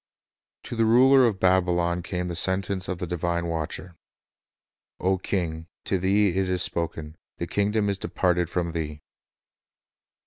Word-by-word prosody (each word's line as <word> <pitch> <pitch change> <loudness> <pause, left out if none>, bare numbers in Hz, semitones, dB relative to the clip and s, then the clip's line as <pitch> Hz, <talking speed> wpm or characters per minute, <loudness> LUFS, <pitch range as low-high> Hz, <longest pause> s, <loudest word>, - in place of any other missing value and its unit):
"" - - -69
To - - -6
the 115 -1 +2
ruler 130 +3 +6
of 100 -4 -2
Babylon 90 -2 +2
came 90 0 -4
the 85 - -4
sentence 95 +2 +1
of 90 - -3
the 90 - -4
Retribution 90 0 -4
divine 85 0 0
Watcher: 85 +2 -4 1.0
O 95 0 +1
king, 85 -4 -3 0.2
"to 95 - 0
thee 100 +3 +3
it 95 +1 -1
is 90 -1 +2
spoken: 80 -2 -3 0.2
The 85 - -3
kingdom 105 +3 0
is 100 -1 -1
departed 90 -2 0
from 85 -1 -2
thee." 75 -2 -5
90 Hz, 160 wpm, -25 LUFS, 85-95 Hz, 1.0 s, ruler